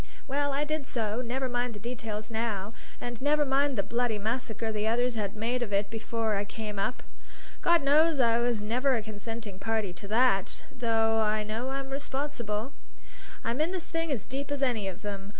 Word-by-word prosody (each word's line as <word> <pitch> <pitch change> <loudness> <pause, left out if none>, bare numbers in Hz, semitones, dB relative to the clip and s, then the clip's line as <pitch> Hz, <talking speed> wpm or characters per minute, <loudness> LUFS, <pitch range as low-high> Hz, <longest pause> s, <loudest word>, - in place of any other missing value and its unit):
Well, 285 +1 +1
I 280 +2 +1
did 305 -2 -2
so; 225 0 -1
never 255 +2 -1
mind 245 -1 -1
the - - -7
details 220 -1 -4
now, 220 -2 -1 0.3
and 240 -1 -5
never 295 +1 +4
mind 275 -1 +2
the 200 - +2
bloody 235 +1 0
massacre 225 +1 -1
the 215 0 0
others 245 +2 +2
had 210 -3 -2
made 235 +4 0
of 230 -4 -2
it 200 +1 +1
before 225 0 -1
I 200 0 +1
came 210 0 -5
up. 250 +6 -1 0.6
God 340 -3 +5
knows 300 +2 +5
I 235 -2 +5
was 235 -3 +1
never 250 +5 +2
a 225 - -1
consenting 215 -1 -6
party 220 -4 0
to 180 +3 -9
that, 215 -3 +3
though 225 -2 +2
I 215 0 +2
know 220 +5 -2
I'm 270 0 -3
responsible. 270 -4 -2 0.7
I'm 235 +5 0
in 325 +3 +2
this 360 -3 -3
thing 330 -1 -1
as 240 -8 -1
deep 275 +2 -4
as 285 -1 0
any 230 -7 +1
of 190 +2 -6
them. 200 -1 -4
230 Hz, 195 wpm, -30 LUFS, 215-265 Hz, 0.7 s, God